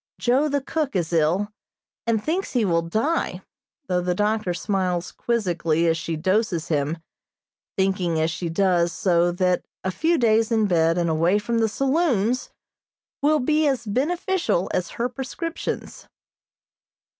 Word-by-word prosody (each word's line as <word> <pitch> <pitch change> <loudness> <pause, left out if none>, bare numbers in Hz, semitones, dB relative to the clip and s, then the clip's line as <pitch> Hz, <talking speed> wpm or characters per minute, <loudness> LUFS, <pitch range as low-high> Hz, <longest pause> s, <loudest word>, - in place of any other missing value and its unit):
Joe, 265 +5 +2
the 285 0 0
cook, 295 -2 -2
is 175 -2 -1
ill, 170 +6 +2 0.6
and 220 -2 +1
thinks 355 +5 -2
he 240 -4 +2
will 170 -3 +2
die, 220 - -1 0.4
though 180 -5 0
the 180 0 -1
doctor 210 -1 0
smiles 180 -1 -1
quizzically 170 -8 0
as 165 - +3
she 165 -1 -3
doses 185 0 0
him, 150 +1 0 0.8
thinking 190 -4 +1
as 160 +1 +1
she 170 +2 -4
does 175 -1 +2
so 175 -1 +2
that 180 0 +1 0.2
a 185 - -1
few 330 - +1
days 225 -2 +3
in 220 -2 +3
bed 165 -3 +2
and 170 -1 +1
away 165 +4 +2
from 230 +3 -1
the 225 -1 +2
saloons 260 - +1 0.7
will 305 +2 +4
be 305 +3 +2
as 260 -4 0
beneficial 330 - 0
as 180 -2 -1
her 235 - +1
prescriptions. 270 +7 -5
200 Hz, 145 wpm, -23 LUFS, 175-250 Hz, 0.8 s, will